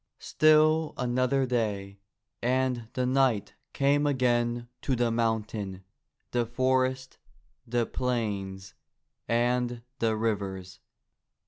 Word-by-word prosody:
Still 155 0 +3
another 130 +2 +1
day, 100 -5 -2 0.4
and 125 -1 0
the 125 - 0
knight 130 -5 +1 0.2
came 145 +1 +2
again 120 -3 +1
to 135 - 0
the 120 -1 +1
mountain, 110 -4 -2 0.5
the 120 -1 +1
forest, 130 +1 0 0.5
the 120 0 +1
plains 100 -7 -3 0.5
and 120 0 0 0.2
the 110 -1 +1
rivers. 100 -4 -3
120 Hz, 95 wpm, -28 LUFS, 110-130 Hz, 0.5 s, Still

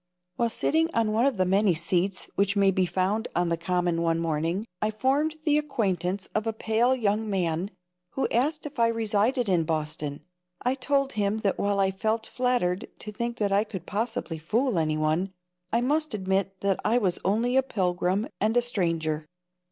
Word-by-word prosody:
While 235 +2 +1
sitting 320 +7 +1
on 225 -2 +2
one 230 +5 +3
of 270 -6 0
the 185 - +2
many 190 0 +3
seats 180 +3 0
which 200 0 +1
may 200 -1 +4
be 185 -1 +1
found 195 +6 0
on 175 0 +1
the 170 - +2
Common 175 0 0
one 165 -1 +1
morning, 165 +4 -1 0.2
I 215 - +2
formed 270 +8 +1
the 300 -1 +3
acquaintance 195 - -1
of 215 +1 -1
a 225 - 0
pale 225 +4 +2
young 215 -2 0
man, 180 -1 0 0.4
who 270 - 0
asked 295 +6 0
me 295 - -5
if 260 - -10
I 230 - +5
resided 230 +2 +1
in 180 -4 +3
Boston. 155 -2 -3 0.4
I 250 - +2
told 275 +1 0
him 205 0 0
that 195 - +1
while 200 0 +1
I 190 -1 +3
felt 220 +3 -1
flattered 245 -8 0
to 215 - -8
think 235 +3 -3
that 205 -2 0
I 200 +1 +4
could 190 -5 -7
possibly 210 -6 -3
fool 220 - +1
anyone, 155 +4 0 0.4
I 235 - +2
must 300 0 0
admit 190 0 -1
that 200 -1 +1
I 225 +3 +3
was 190 -7 +1
only 230 +6 +1
a 265 - +6
pilgrim 185 -3 0
and 220 +3 +2
a - - +5
stranger. 165 -8 -1
200 Hz, 190 wpm, -27 LUFS, 180-235 Hz, 0.4 s, a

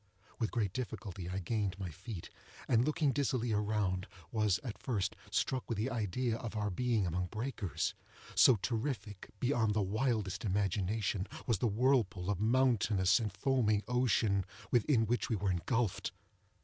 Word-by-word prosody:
With 115 - +1
great 105 -6 -1
difficulty 100 -7 -5
I 95 - -3
gained 100 0 -1
my 95 -3 -4
feet, 95 +3 -8 0.4
and 115 0 +4
looking 150 0 +2
dizzily 125 -4 0
around, 105 -2 0 0.2
was, 105 -4 +2
at 115 -5 -6
first, 110 -8 -1
struck 130 -2 -1
with 115 - -1
the 115 +6 -1
idea 115 +1 -1
of 115 -2 -6
our 105 -1 -1
being 115 0 +1
among 90 +1 -1
breakers; 105 - -2 0.4
so 130 - +7
terrific, 110 -2 -3
beyond 115 -4 +2
the 105 - +2
wildest 110 -1 0
imagination, 100 0 0 0.2
was 115 - +1
the 120 - +2
whirlpool 105 -5 +2
of 100 - -2
mountainous 110 -4 +3
and 110 -3 -2
foaming 110 -1 +1
ocean 115 -5 +2 0.3
within 120 -1 +3
which 120 +3 0
we 115 - +2
were 100 -1 0
engulfed. 110 +4 0
110 Hz, 150 wpm, -34 LUFS, 100-120 Hz, 0.4 s, so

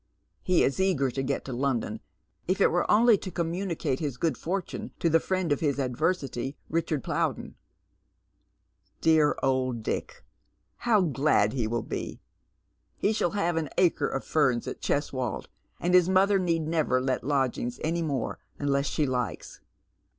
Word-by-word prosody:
He 180 -3 +3
is 135 - 0
eager 165 -9 +2
to 135 - -2
get 135 +1 -2
to 130 - -5
London, 130 -2 -1 0.5
if 185 +2 0
it - - +4
were 175 - 0
only 225 -1 +5
to 190 - -6
comvnunicate 170 -5 -2
his 145 -6 -3
good 165 +3 0
fortune 185 +2 -4
to 165 - +1
the 165 - +5
friend 185 -2 -1
of 145 - +2
his 145 -4 0
adversity, 135 -1 -1
Richard 160 -3 -1
Plowden. - - -2 0.7
" 85 +3 -45
Dear 155 -2 +4
old 130 -3 0
Dick! - - -4 0.5
how 225 -4 +3
glad 135 - +2
he 120 -5 -1
will 115 0 -2
be! - - -5 0.8
He 215 - +1
shall 185 -5 0
have 175 -4 +1
an 155 -3 -1
Bcre 175 -3 +2
of 135 - -2
ferns 130 -6 +1
at - - -6
Cheswold, 130 -5 -2 0.3
and 180 +1 0
his 180 -1 +6
mother 195 +1 +4
need 170 -3 0
never 155 -5 +1
let 130 0 -1
lodgings 130 -3 -1
Any 165 +2 0
more 140 -7 -2 0.2
unless 140 -1 0
she 150 - 0
likes." 125 -3 -3
150 Hz, 160 wpm, -27 LUFS, 130-175 Hz, 0.8 s, his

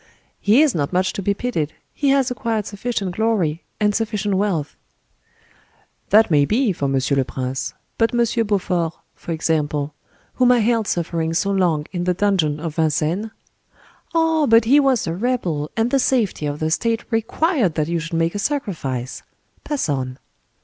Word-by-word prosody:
"He 225 +9 +5
is 300 - +2
not 145 -2 -1
much 185 +1 +1
to - - -4
be 200 +1 0
pitied: 165 -10 -2 0.2
he 285 - 0
has 270 -2 +3
acquired 230 -4 -2
sufficient 205 -3 -3
glory, 190 -8 0 0.2
and 210 -1 +2
sufficient 210 -2 -1
wealth." 190 -7 -1 1.3
"That 215 -1 +5
may 145 -2 +5
be, 220 - +1
for 140 -4 -2
Monsieur 135 +1 +1
le 135 - +3
Prince; 130 0 -4 0.2
but 225 0 +3
M. 235 -1 +1
Beaufort, 180 -5 0 0.2
for - - -8
example—whom 155 - -1
I 250 - +5
held 225 -1 +1
suffering 165 -1 -1
so 200 +3 +1
long 175 -6 +1
in 175 -2 -3
the 180 0 +1
dungeon 175 -7 +1
of 160 0 -5
Vincennes?" 160 +6 0 0.9
"Ah! 325 -2 +3
but 225 0 +5
he 275 +6 +6
was 270 -5 +2
a 165 - -2
rebel, 175 -8 -1
and 225 +2 +1
the 275 - +3
safety 230 - +1
of 145 0 -3
the 155 0 -1
state 230 +6 0
required 225 - +1
that 155 -2 0
you 170 0 -1
should 165 +1 -6
make 165 0 +1
a 205 - -3
sacrifice. 165 - -3 0.4
Pass 295 - -2
on!" 130 -3 -2
195 Hz, 170 wpm, -21 LUFS, 155-230 Hz, 1.3 s, he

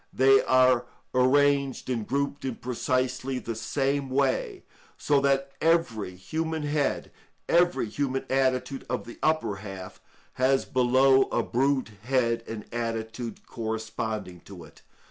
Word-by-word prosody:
They 135 +1 +5
are 130 -1 +4 0.3
arranged 140 +1 +2
and 115 -4 -2
grouped 140 +1 -2
in 130 -3 -3
precisely 130 +1 -1
the 115 -2 -4
same 135 +5 -1
way; 135 0 0 0.3
so 145 -1 +2
that 140 0 +1
every 125 - +1
human 160 - -3
head, 145 -1 -1 0.4
every 175 -7 +3
human 135 +3 -2
attitude 130 0 0
of 125 -5 -2
the 120 - -11
upper 155 -10 +1
half, 95 -2 -9 0.4
has 135 +1 +3
below 130 +1 +4
a - - -1
brute 130 -1 0
head 115 -1 +1
and 110 -2 -6
attitude 115 0 -4
corresponding 110 -4 -4
to 90 -4 -11
it. 80 - -17
130 Hz, 125 wpm, -27 LUFS, 115-140 Hz, 0.4 s, They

